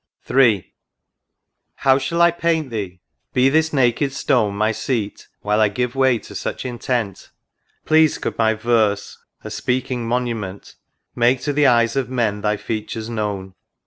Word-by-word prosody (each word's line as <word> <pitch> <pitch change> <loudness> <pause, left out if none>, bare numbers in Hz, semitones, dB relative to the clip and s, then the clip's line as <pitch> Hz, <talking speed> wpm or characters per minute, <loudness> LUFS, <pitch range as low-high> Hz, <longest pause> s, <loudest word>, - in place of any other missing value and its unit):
THE - - -8
RIVER 135 -2 +7
DUDDON. 110 - +2
III. - - -36 1.0
How 135 -1 +3
shall 170 +5 -1
I 170 - +6
paint 165 -5 -1
thee? 95 -5 -5 0.2
— - - -53
Be 130 +1 +4
this 160 +2 +2
naked 135 0 +1
stone 110 -6 +1
My 110 +2 +1
seat 110 -2 -3
while 105 +1 +1
I 110 - +5
give 125 +4 -2
way 130 -2 +3
to - - -12
such - - -4
intent; 120 -5 -3 0.6
Pleased 155 0 +4
could - - -3
my 110 -1 +2
verse, 110 -3 0 0.2
a - - -7
speaking 125 -1 -2
monument, 115 -5 -3 0.4
Make 120 +2 +2
to 145 - -1
the 145 0 +4
eyes 115 -1 +3
of 135 -2 -1
men 115 -5 -1
thy 105 0 0
features 110 +1 -5
known. 100 -4 -3
120 Hz, 170 wpm, -20 LUFS, 105-135 Hz, 1.0 s, RIVER